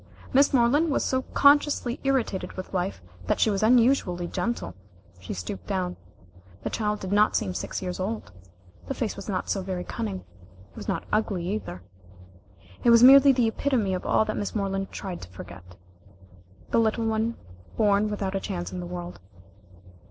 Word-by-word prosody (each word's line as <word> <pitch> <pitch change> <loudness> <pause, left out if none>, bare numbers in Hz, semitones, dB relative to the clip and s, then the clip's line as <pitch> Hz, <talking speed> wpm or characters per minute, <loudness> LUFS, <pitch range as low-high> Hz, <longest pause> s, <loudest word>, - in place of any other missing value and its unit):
Miss 280 +2 +5
Moreland 275 +6 +3
was 280 - 0
so 260 0 +1
consciously 285 -3 +4
irritated 265 -8 -1
with 185 +1 -8
life 180 - -2 0.2
that - - +1
she 220 - +3
was 195 - -1
unusually 225 -6 +3
gentle. 235 - -3 0.5
She 95 - -8
stooped 90 +1 -6
down. 180 -2 -2 0.7
The - - -3
child 210 -1 -1
did 190 - -5
not 210 +1 +3
seem 195 -4 0
six 185 - -4
years 180 0 -4
old. 215 +4 -4 0.6
The 275 - -3
face 230 -4 -2
was 200 +1 -8
not 185 -2 -2
so 195 - -1
very 185 -1 -4
cunning. 95 - -5 0.5
It - - -27
was - - -8
not - - -1
ugly, 200 -5 0
either. 195 - -5 1.0
It - - +4
was 235 0 +7
merely 275 +2 +9
the 245 -3 +2
epitome 225 -4 0
of 180 - -3
all 220 - +2
that 215 - -3
Miss 205 - -3
Moreland 195 -1 -2
tried 185 -3 -6
to 90 - -10
forget 90 -1 -11 1.0
the - - +3
little 225 0 +1
one 225 +1 0 0.4
born 210 -1 +3
without 200 -2 -3
a 195 - 0
chance 180 -3 -4
in 180 - -5
the 175 - -5
world. 175 - -7
205 Hz, 175 wpm, -26 LUFS, 180-235 Hz, 1.0 s, merely